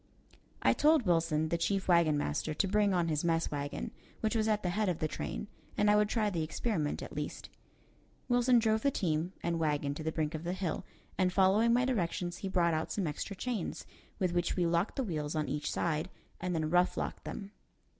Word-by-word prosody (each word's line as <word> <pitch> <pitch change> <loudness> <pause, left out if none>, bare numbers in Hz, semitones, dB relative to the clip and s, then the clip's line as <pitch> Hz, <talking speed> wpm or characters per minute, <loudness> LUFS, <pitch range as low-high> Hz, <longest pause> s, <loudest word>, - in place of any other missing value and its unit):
I - - +5
told 305 -4 +4
Wilson, 165 -3 +2
the 170 - 0
chief 195 +3 0
wagon 170 -4 +4
master, 145 - -1
to 195 - +1
bring 205 +1 +3
on 175 -3 +2
his 155 -1 0
mess 165 -1 +1
wagon, 145 -1 -4 0.3
which 220 +1 0
was 220 -1 +2
at 215 -1 +1
the 180 - 0
head 210 +1 +1
of 175 - -1
the 155 - -1
train, 205 - -4 0.3
and 210 0 +4
I - - +5
would 210 0 +3
try 215 -3 +1
the 170 -3 -1
experiment 155 -1 -1
at - - -8
least. - - -5 0.8
Wilson 245 0 +4
drove 220 -1 +2
the 280 - +3
team 175 - -1
and 170 -1 0
wagon 145 -2 0
to 150 - -7
the 160 +1 -1
brink 155 0 -1
of 155 0 -4
the 175 +1 -2
hill, 185 -3 -3 0.3
and 185 -1 +3
following 195 +5 +4
my 245 +2 +3
directions 175 -7 -1
he 195 - -4
brought 175 -3 +2
out 155 +1 -1
some 200 - -1
extra 160 +6 -4
chains 225 -3 -3 0.3
with 185 -2 0
which 175 -1 0
we 180 - +1
locked 170 +3 +1
the 270 - 0
wheels 155 -7 -3
on 155 -2 0
each 145 +2 -2
side, 160 +1 -1 0.3
and 180 -1 -2
then 155 -1 -1
rough 180 +1 +3
locked - - -3
them. 200 -1 -6
175 Hz, 215 wpm, -32 LUFS, 160-210 Hz, 0.8 s, I